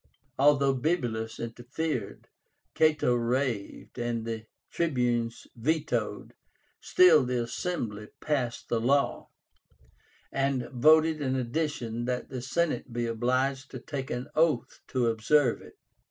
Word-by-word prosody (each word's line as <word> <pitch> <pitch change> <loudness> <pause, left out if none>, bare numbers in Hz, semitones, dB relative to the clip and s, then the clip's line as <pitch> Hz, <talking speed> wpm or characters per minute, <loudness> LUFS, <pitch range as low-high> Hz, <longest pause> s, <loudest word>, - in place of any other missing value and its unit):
Although 140 -1 +4
Bibulus 120 -7 -1
interfered, 120 +7 -4 0.5
Cato 155 -5 +3
raved, 120 -2 -2
and 120 -1 -2
the 115 -1 -5 0.2
Tribunes 120 -7 0
vetoed, 140 -3 -1 0.5
still 180 -5 +6
the 125 -1 -1
Assembly 115 - -4
passed 130 -6 -2
the 115 -1 0
law, 140 +4 +1 1.0
and 135 -2 0
voted 155 +4 +4
in 130 -2 0
addition 120 -3 -2
that 125 0 -3
the 130 -2 -5
Senate 150 0 -1
be 120 0 -1
obliged 130 +4 0
to 130 - -7
take 135 0 -5
an 125 +2 -3
oath 160 -1 +1
to 125 -2 0
observe 115 +4 +2
it. - - -15
130 Hz, 115 wpm, -28 LUFS, 120-150 Hz, 1.0 s, still